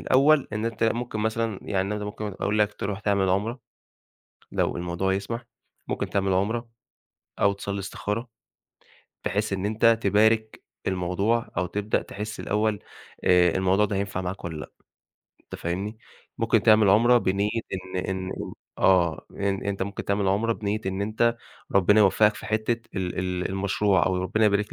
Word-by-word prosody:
الأول، 140 Hz, +2 st, +4 dB
إن 105 Hz, +1 st, -2 dB
أنت 115 Hz, -1 st, -1 dB
ممكن 115 Hz, -1 st, -1 dB
مثلًا 110 Hz, -1 st, -1 dB
يعني 95 Hz, -2 st, -1 dB
أنا 105 Hz, +1 st, -2 dB
ده 105 Hz, -, -5 dB
ممكن 105 Hz, +1 st, -5 dB, 0.2 s
أقول 105 Hz, +1 st, 0 dB
لك 105 Hz, 0 st, +2 dB
تروح 100 Hz, +1 st, -4 dB
تعمل 100 Hz, -3 st, +1 dB
عُمرة، 110 Hz, +7 st, 0 dB, 0.9 s
لو -, -, 0 dB
الموضوع 90 Hz, +2 st, -1 dB
يسمح، 115 Hz, +5 st, -4 dB, 0.4 s
ممكن -, -, -2 dB
تعمل 95 Hz, -1 st, +1 dB
عُمرة 115 Hz, +5 st, 0 dB, 0.7 s
أو 100 Hz, -, +4 dB
تصلّي 100 Hz, 0 st, -4 dB
استخارة، 105 Hz, +4 st, -4 dB, 1.0 s
بحيث 105 Hz, +1 st, -1 dB
إن 95 Hz, 0 st, -1 dB
أنت 115 Hz, +2 st, +4 dB
تبارك 110 Hz, +2 st, +2 dB, 0.2 s
الموضوع 95 Hz, +5 st, 0 dB
أو 90 Hz, -, +1 dB
تبدأ 105 Hz, +4 st, -1 dB
تحِس 105 Hz, +1 st, -6 dB
الأول 105 Hz, 0 st, 0 dB, 0.5 s
آآ 90 Hz, -1 st, +5 dB
الموضوع 95 Hz, +2 st, +3 dB
ده 100 Hz, -1 st, -1 dB
هينفع 100 Hz, -1 st, -2 dB
معاك 90 Hz, 0 st, -5 dB
والّا 80 Hz, -2 st, -4 dB
لأ، -, -, -9 dB, 0.7 s
أنت -, -, -12 dB
فاهمني، 100 Hz, +6 st, -3 dB, 0.4 s
ممكن -, -, +2 dB
تعمل 110 Hz, -2 st, +6 dB
عُمرة 120 Hz, +5 st, +6 dB
بنية 100 Hz, 0 st, 0 dB, 0.2 s
إن 95 Hz, -1 st, -4 dB
إن 95 Hz, 0 st, -3 dB
إن -, -, -6 dB, 0.3 s
آه، 85 Hz, -4 st, +3 dB
إن 100 Hz, -1 st, -2 dB
أنت 100 Hz, -1 st, -2 dB
ممكن 100 Hz, +1 st, -4 dB
تعمل 100 Hz, -1 st, +1 dB
عُمرة 110 Hz, +4 st, +2 dB
بنية 105 Hz, -1 st, -2 dB
إن 95 Hz, +1 st, -1 dB
أنت 115 Hz, +3 st, +1 dB, 0.4 s
ربِّنا 100 Hz, +2 st, +5 dB
يوفَّقك 105 Hz, +1 st, +5 dB
في -, -, -9 dB
حتّة 110 Hz, +2 st, 0 dB, 0.2 s
ال 90 Hz, -1 st, -2 dB
ال 90 Hz, 0 st, -1 dB
المشروع 95 Hz, 0 st, +1 dB
أو 90 Hz, 0 st, 0 dB
ربِّنا 110 Hz, +4 st, +1 dB
يبارك 105 Hz, 0 st, +2 dB
100 Hz, 165 wpm, -25 LUFS, 95-110 Hz, 1.0 s, تعمل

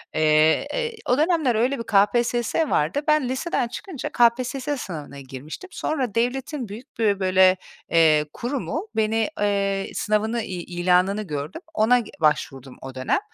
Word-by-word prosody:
Eee, 155 Hz, 0 st, +3 dB
eee, 465 Hz, -2 st, -2 dB
o 250 Hz, -, +4 dB
dönemler 310 Hz, -5 st, +2 dB
öyle 250 Hz, +4 st, +1 dB
bir -, -, -3 dB
KPSS 235 Hz, +8 st, +2 dB
vardı. 155 Hz, -, +1 dB
Ben 305 Hz, -4 st, +3 dB
liseden 260 Hz, -1 st, -1 dB
çıkınca 285 Hz, -, -6 dB
KPSS 255 Hz, +4 st, +1 dB
sınavına 150 Hz, -, -7 dB
girmiştim. 140 Hz, -, -9 dB
Sonra 260 Hz, -9 st, -2 dB
devletin 260 Hz, +3 st, -1 dB
büyük 235 Hz, +7 st, -11 dB
bir 205 Hz, -3 st, +2 dB
böyle, 185 Hz, 0 st, +4 dB, 0.3 s
eee, 155 Hz, -2 st, +4 dB
kurumu, 280 Hz, -, -3 dB
beni, 220 Hz, 0 st, +1 dB
eee, 200 Hz, -1 st, 0 dB
sınavını 220 Hz, +2 st, 0 dB
i 185 Hz, -5 st, -5 dB
ilanını 180 Hz, +3 st, +1 dB
gördüm. 150 Hz, -, -5 dB
Ona 245 Hz, -1 st, +3 dB, 0.2 s
başvurdum 135 Hz, -4 st, 0 dB
o 135 Hz, 0 st, -8 dB
dönem. 130 Hz, -, 0 dB
220 Hz, 140 wpm, -23 LUFS, 175-255 Hz, 0.3 s, o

